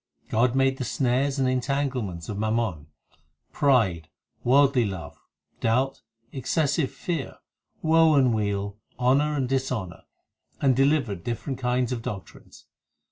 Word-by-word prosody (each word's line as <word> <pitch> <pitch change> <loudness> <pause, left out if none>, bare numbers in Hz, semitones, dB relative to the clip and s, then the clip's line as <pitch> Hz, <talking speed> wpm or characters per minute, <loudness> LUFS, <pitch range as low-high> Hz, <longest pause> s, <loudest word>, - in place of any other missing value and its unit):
God 120 +3 +2
made 135 0 +2
the - - -1
snares 130 +3 0
and 135 -1 +2
entanglements 130 - -1
of 105 -1 -4
mammon, 110 -8 -1 0.6
Pride, 105 - +2 0.3
worldly 135 0 +4
love, 95 -8 -6 0.4
doubt, 130 +4 0 0.3
excessive 140 +2 0
fear, 165 -6 -4 0.5
Woe 160 -1 +5
and 130 -4 +4
weal, 100 -1 -2 0.2
honour 140 +4 +2
and 135 -3 0
dishonour, 130 -8 -3 0.5
And 135 -3 +3
delivered 135 - +1
different 125 +3 -4
kinds 125 0 0
of 120 -2 -2
doctrines. 100 -4 -9
125 Hz, 120 wpm, -25 LUFS, 110-135 Hz, 0.6 s, Woe